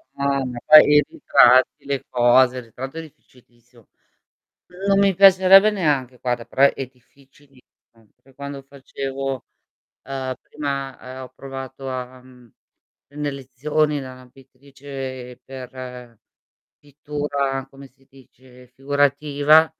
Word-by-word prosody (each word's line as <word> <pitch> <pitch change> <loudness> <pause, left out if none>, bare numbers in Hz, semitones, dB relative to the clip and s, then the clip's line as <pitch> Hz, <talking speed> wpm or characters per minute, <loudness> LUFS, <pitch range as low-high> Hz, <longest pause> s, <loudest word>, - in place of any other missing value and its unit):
Ma 140 -1 -1 0.2
poi 155 0 +9
i 150 - +6
ritratti, 130 +3 +4
le 140 -2 -3
cose, 125 +1 +4
il 125 - -6
ritratto 130 +6 -9
è 165 - -4
difficilissimo. 120 -5 -21 1.0
Non 195 0 +3
mi 200 -1 +3
piacerebbe 195 +2 +7
neanche 140 -10 -1
guarda, 120 -2 -2
però 135 - 0
è 135 - -5
difficilissimo. 135 +1 -25 0.6
Per 135 0 -24
quando 140 0 -8
facevo, 135 -1 -6 0.6
ehm, 130 -1 -5
prima, 140 -3 -5 0.2
ehm, 130 - -7
ho 130 - -9
provato 135 0 -8
a 130 0 -6
mhmm, 125 -3 -19 0.6
e - - -20
ne 150 -1 -3
lezioni 145 +3 -2
la 130 -1 -11
pittrice 135 -1 -10
per 125 -3 -10 0.6
pittura 145 -2 -4
come 135 0 -14
si 135 +1 -31
dice, 125 -1 -19
figurativa 145 +3 +2
135 Hz, 120 wpm, -21 LUFS, 130-145 Hz, 1.0 s, poi